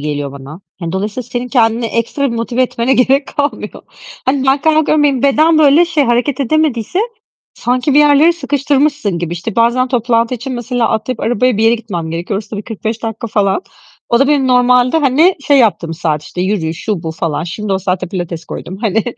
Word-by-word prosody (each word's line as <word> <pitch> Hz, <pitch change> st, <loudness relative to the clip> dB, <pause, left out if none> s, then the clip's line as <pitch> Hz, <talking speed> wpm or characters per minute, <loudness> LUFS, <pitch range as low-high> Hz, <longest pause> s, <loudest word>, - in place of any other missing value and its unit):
geliyor 145 Hz, -1 st, -3 dB
bana. 140 Hz, +5 st, -10 dB, 0.2 s
Hani, 165 Hz, -1 st, -4 dB
dolayısıyla 205 Hz, +6 st, -3 dB
senin 245 Hz, +1 st, -5 dB
kendini 230 Hz, -1 st, +1 dB
ekstra 235 Hz, +4 st, -1 dB
bir 235 Hz, -, -4 dB
motive 235 Hz, +2 st, -1 dB
etmene 250 Hz, +1 st, 0 dB
gerek 265 Hz, +2 st, +2 dB
kalmıyor. 285 Hz, 0 st, -3 dB, 0.4 s
Hani, 265 Hz, 0 st, 0 dB
ben 270 Hz, +1 st, +3 dB
kalkıyorum, 310 Hz, -1 st, +2 dB
benim 275 Hz, -3 st, +1 dB
beden 310 Hz, +3 st, +4 dB
böyle 305 Hz, +2 st, +5 dB
şey, 320 Hz, -4 st, 0 dB
hareket 245 Hz, +3 st, 0 dB
edemediyse 280 Hz, -, 0 dB, 0.6 s
sanki 250 Hz, +3 st, 0 dB
bir -, -, +6 dB
yerlere 295 Hz, +3 st, +5 dB
sıkıştırmışsın 285 Hz, -, 0 dB
gibi. 170 Hz, -1 st, -4 dB
İşte, 175 Hz, +5 st, -5 dB
bazen 240 Hz, +2 st, +2 dB
toplantı 235 Hz, -1 st, +1 dB
için, 250 Hz, +3 st, -6 dB
mesela, 245 Hz, -1 st, -1 dB
atlayıp 220 Hz, +2 st, -2 dB
arabaya 245 Hz, +1 st, +1 dB
bir 220 Hz, -, +1 dB
yere 225 Hz, +1 st, +5 dB
gitmem 190 Hz, -8 st, -5 dB
gerekiyor. 175 Hz, +4 st, -3 dB
Orası 210 Hz, 0 st, -10 dB
da 215 Hz, -, -5 dB
bir 205 Hz, -, -5 dB
45 220 Hz, +1 st, -5 dB
dakika 225 Hz, 0 st, -4 dB
falan. 205 Hz, -, 0 dB, 0.5 s
O 235 Hz, -, +3 dB
da 275 Hz, -, +3 dB
benim 285 Hz, -3 st, +2 dB
normalde, 250 Hz, +2 st, +3 dB
hani, 315 Hz, +6 st, +3 dB
şey 285 Hz, -1 st, +5 dB
yaptığım 170 Hz, -8 st, +1 dB
saat, 155 Hz, -2 st, -2 dB
işte, 180 Hz, -, -7 dB
yürüyüş, 180 Hz, -4 st, -2 dB
şu, 200 Hz, -6 st, -2 dB
bu 160 Hz, -, -4 dB
falan. 160 Hz, -1 st, -3 dB
Şimdi 200 Hz, +4 st, -4 dB
o 190 Hz, -, +1 dB
saate 185 Hz, -1 st, -2 dB
pilates 175 Hz, -3 st, -5 dB
koydum 185 Hz, -, -7 dB
hani. 220 Hz, 0 st, 0 dB
235 Hz, 195 wpm, -14 LUFS, 195-275 Hz, 0.6 s, bir